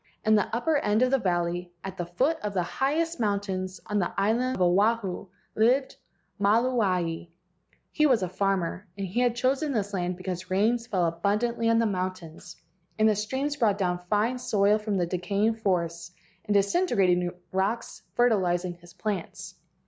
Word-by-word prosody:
In 215 - +4
the 210 -2 +3
upper 295 +7 +1
end 220 -4 +2
of 255 - +2
the 270 - +3
valley, 175 -2 -1
at 195 -1 -6
the 175 -3 -4
foot 270 - 0
of 205 -1 -4
the 180 - +2
highest 305 - -1
moun¬ 205 -2 +1
tains 185 -2 -5
on 210 -1 -1
the 175 - -1
island 240 +6 +1
Oahu, 195 +2 +1 0.3
lived 250 +5 +2 0.5
Maluae. 200 -7 +1 0.6
He 305 - +3
was 240 -8 +3
a - - 0
farmer, 190 0 -1
and 195 - -3
had 240 +5 +1
chosen 270 +4 0
this 205 -3 -2
land 180 -1 -2
because 185 0 -5
rain 215 +6 +2
fell 205 -7 -1
abundantly 210 +8 0
on 230 - +4
the 230 - +3
mountains, 185 -5 -4 0.4
and 215 0 +4
the 215 - +4
streams 265 +8 -2
brought 215 -6 +2
down 180 -3 0
fine 225 +5 +1
soil 210 -3 +2
from 210 -2 -2
the 175 - +1
decaying 200 +5 0
forests 170 -5 -1 0.4
and 205 - 0
disintegrating 195 - +2 0.2
rocks, 200 +5 -1
fertilizing 185 -7 +2
his 175 0 -17
plants. 195 -2 -5
205 Hz, 165 wpm, -27 LUFS, 180-235 Hz, 0.6 s, In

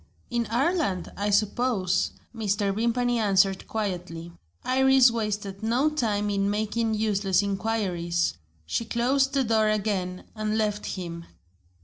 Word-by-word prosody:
"In 235 -2 0
Ireland, 250 - 0
I 205 +1 -1
suppose," 205 -2 +1 0.3
Mr. 205 -2 0
Vimpany 235 +2 +1
answered 195 -2 +2
quietly. 180 -5 -4 0.3
Iris 265 -1 +5
wasted 210 -3 -3
no 245 +7 +2
time 210 -8 0
in 200 0 +1
making 220 +2 0
useless 205 -3 +1
inquiries. 190 -4 -1 0.3
She 155 - -1
closed 265 +4 +1
the 270 - +3
door 220 -2 +2
again, 195 -4 -1
and 215 0 -1
left 210 -1 -1
him. 170 -2 -5
215 Hz, 120 wpm, -26 LUFS, 195-235 Hz, 0.3 s, Iris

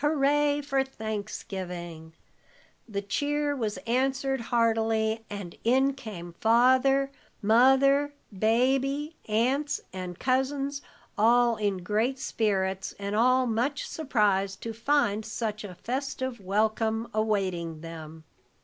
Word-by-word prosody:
Hooray 295 0 +2
for 275 -1 +1
Thanksgivin'!" 190 -8 -6 0.8
The 200 -1 -3
cheer 290 +7 -1
was 220 -6 -2
answered 270 +2 0
heartily, 225 -1 +1
and 200 -4 -7
in 265 +4 +3
came 200 -10 -8
Father, 260 +4 +4 0.3
Mother, 270 +6 +4 0.2
Baby, 270 - +1
aunts 265 +7 +1
and 180 -2 -6
cousins, 275 +3 0 0.4
all 235 +2 +4
in 200 -4 -1
great 220 +7 0
spirits, 195 -6 -1
and 200 0 -3
all 255 +3 +4
much 245 +5 -1
surprised 205 -9 0
to 230 - -4
find 225 -3 +1
such 215 -1 -4
a 190 -3 -8
festive 260 +1 -3
welcome 220 +3 0
awaiting 185 -7 -1
them. 160 -1 -9
225 Hz, 105 wpm, -28 LUFS, 205-270 Hz, 0.8 s, Father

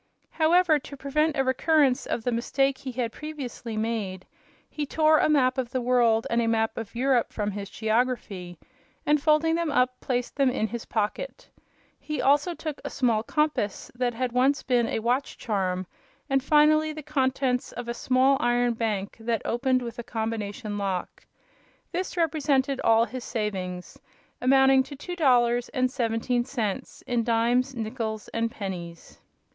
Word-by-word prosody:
However, 325 -1 +4
to 280 +1 -10
prevent 300 +3 0
a 270 - +3
recurrence 265 0 +2
of 230 - -2
the 245 - 0
mistake 265 +3 0
he 265 - -6
had 240 -2 -2
previously 255 -6 -6
made, 215 -4 -3 0.4
he 300 - -4
tore 310 +1 +4
a - - +3
map 260 -3 +3
of 250 -2 -2
the 255 - -1
world 240 -2 +3
and 235 0 +2
a 230 - 0
map 225 -1 +1
of 225 0 -7
Europe 250 -1 +2
from 210 -1 -2
his 200 0 -6
geography, 220 -6 -1 0.5
and, 295 0 +3
folding 310 +2 +3
them 335 -1 0
up, 250 -1 +1
placed 245 0 -2
them 275 -2 +4
in 220 - 0
his 230 +2 -5
pocket. 220 - -3 0.5
He 305 -1 -4
also 295 +5 +3
took 310 -3 -6
a - - -4
small 235 -5 +1
compass 295 -5 -1
that 245 -1 -1
had 250 +1 -1
once 265 +3 +2
been 245 -3 +2
a - - -1
watch 245 +5 -1
charm, 190 -4 -1 0.4
and, 270 -1 +1
finally, 310 +1 +4
the 310 0 -8
contents 265 -3 0
of 245 0 -7
a 235 - -2
small 260 +3 +3
iron 240 -1 +2
bank 215 -4 -2
that 225 0 -1
opened 255 +1 +1
with 240 +1 -7
a - - -4
combination 220 -2 -4
lock. 190 -3 -3 0.7
This 370 +1 -3
represented 285 -5 +1
all 225 0 +4
his 255 0 -7
savings, 190 -6 -4 0.4
amounting 265 +1 +5
to 285 +2 -7
two 355 +6 -6
dollars 245 -6 +3
and 255 -1 0
seventeen 240 -1 0
cents 240 -1 -4
in 240 -1 0
dimes, 240 +3 +1
nickles 220 -1 -4
and 230 0 -1
pennies. 180 -6 -7
245 Hz, 165 wpm, -26 LUFS, 225-275 Hz, 0.7 s, amounting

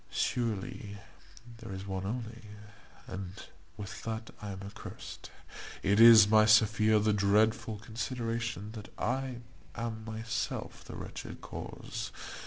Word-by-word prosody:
Surely 105 -2 -2 0.6
there 115 -4 -8
is 95 0 -5
one 95 -1 -3
only, 115 0 -4 0.6
and 95 0 -7 0.3
with 100 -2 -7
that 110 0 -4
I 105 - -5
am 95 0 -6
accursed. 100 +1 -9 0.5
It 100 +2 +3
is, 115 -2 +10
my 110 0 +6
Sophia, 110 0 +5
the 105 0 +3
dreadful 105 +2 +3
consideration 115 -1 -3
that 110 -2 -9
I 130 -2 -1 0.3
am 115 -1 -4
myself 115 +1 -4
the - - -9
wretched - - -7
cause. - - -6
110 Hz, 120 wpm, -32 LUFS, 100-115 Hz, 0.6 s, is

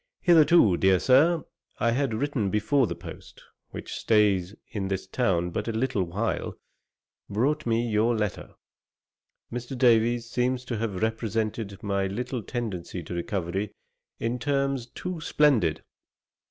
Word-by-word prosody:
Hitherto, 165 - +5
dear 95 +1 +4
Sir, 155 - +4 0.4
I 115 - +2
had 130 -2 0
written 120 -4 -1
before 110 +6 +2
the - - -4
post, - - -11 0.3
which - - -7
stays 100 -3 +2 0.2
in 100 -5 -3
this 95 -1 -3
town 95 -5 0
but 105 +5 -3
a - - 0
little 110 -2 0
while, 100 +7 -2 0.7
brought 140 +8 0
me 115 +1 +1
your 110 +2 +2
letter. 105 -3 -3 1.0
Mr. 120 +2 -5
Davies 120 -1 +3
seems 125 +1 -1
to 120 - -3
have 110 -4 -2
represented 110 -2 -2
my 100 -1 0
little 125 +5 -3
tendency 100 -7 -5
to 80 - -7
recovery 95 +2 -3 0.4
in 120 +2 -2
terms 140 -2 0
too 180 +5 -6
splendid. 115 - +2
115 Hz, 135 wpm, -26 LUFS, 100-125 Hz, 1.0 s, Hitherto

